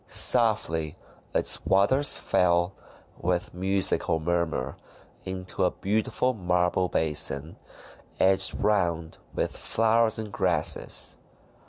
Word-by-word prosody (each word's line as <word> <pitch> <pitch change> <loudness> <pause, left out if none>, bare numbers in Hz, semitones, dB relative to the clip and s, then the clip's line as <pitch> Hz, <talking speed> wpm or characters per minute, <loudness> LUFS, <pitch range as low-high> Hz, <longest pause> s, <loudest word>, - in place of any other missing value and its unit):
Softly 105 -10 +1 0.4
its - - +1
waters 130 +9 +3
fell, 85 +1 +1 0.5
with 90 0 -2
musical 95 -2 0
murmur, 80 -5 -2 0.5
into 95 -1 -4
a - - +3
beautiful 110 +5 -1
marble 90 -2 0
basin, 75 -1 0 0.6
edged 95 0 +3
round 85 -6 -1 0.2
with - - -2
flowers 115 0 +1
and 110 -2 -5
grasses. 90 -7 0
90 Hz, 90 wpm, -26 LUFS, 85-105 Hz, 0.6 s, waters